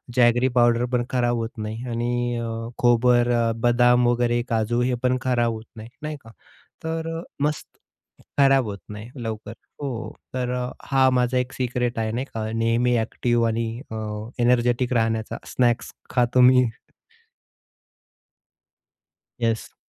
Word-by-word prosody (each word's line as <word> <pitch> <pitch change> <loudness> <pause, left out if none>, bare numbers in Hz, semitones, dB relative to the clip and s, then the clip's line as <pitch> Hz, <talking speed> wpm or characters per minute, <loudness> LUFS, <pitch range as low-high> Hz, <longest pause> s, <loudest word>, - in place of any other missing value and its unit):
Jaggery 120 +1 +4
powder 120 0 +4
पण 120 -1 +2
खराब 120 -1 +1
होत 115 0 -2
नाही. 110 +2 -5
आणि 120 +1 -1
अ, 115 -1 -3 0.3
खोबरं, 120 -1 +3
बदाम 120 0 +4
वगैरे, 120 0 +2
काजू 115 +1 +1
हे 125 +1 +1
पण 130 0 +2
खराब 120 -2 +1
होत 110 0 -8
नाही, 110 0 -9
नाही 150 0 -4
का? 115 - -14 0.5
तर 165 0 -3 0.2
मस्त 150 +1 -1 0.7
खराब 135 -2 +5
होत 100 -2 -5
नाही, 105 +2 -8
लवकर, 110 -1 -5 0.3
हो. 130 -5 -4 0.2
तर 125 -1 -2
अ, 125 0 -2 0.2
हा 135 -1 +5
माझा 125 0 +1
1 125 +1 -1
सीक्रेट 125 -2 -1
आहे, 110 -1 -1
नाही 125 +4 -2
का, 110 -1 -3
नेहमी 115 +2 +2
एक्टिव्ह 120 +1 0
आणि 115 +1 -1 0.2
अ, - - -4 0.5
एनर्जेटिक 120 +1 +2
राहण्याचा. 115 -1 0
स्नॅक्स 120 -2 +1 0.2
खातो 125 0 +3
मी. 125 0 +7 2.8
येस. 115 -2 -1
120 Hz, 135 wpm, -24 LUFS, 115-125 Hz, 2.8 s, मी